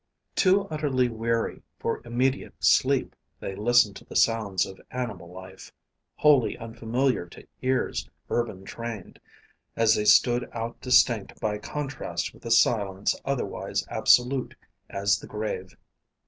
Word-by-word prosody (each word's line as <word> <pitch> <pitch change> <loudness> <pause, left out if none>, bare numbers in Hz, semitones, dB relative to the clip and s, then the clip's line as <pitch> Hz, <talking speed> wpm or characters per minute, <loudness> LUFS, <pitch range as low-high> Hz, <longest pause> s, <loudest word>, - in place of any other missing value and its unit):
Too 190 +1 +4
utterly 140 -5 0
weary 115 0 -2 0.2
for - - -2
immediate 125 +3 -1
sleep, - - +2 0.2
they 95 - -5
listened 110 0 +3
to - - -13
the - - -12
sounds 110 -5 +2
of 95 - -11
animal 110 -9 -5
life 95 +1 -11 0.4
wholly 145 -6 +4
unfamiliar 115 -1 -1
to - - -14 0.2
ears 130 0 -1 0.2
urban 110 -5 -2
trained 115 -3 -7 0.6
as 115 -1 +4
they 105 - 0
stood 120 +3 +4
out 115 0 -5
distinct 120 -5 +3
by 105 -1 -2
contrast 145 +4 -4
with - - -19
a - - -3
silence 105 -4 +2
otherwise 140 -2 -2
absolute 125 +1 +3 0.3
as 100 0 +1
the - - -11
grave. 105 0 -5
115 Hz, 130 wpm, -26 LUFS, 105-125 Hz, 0.6 s, Too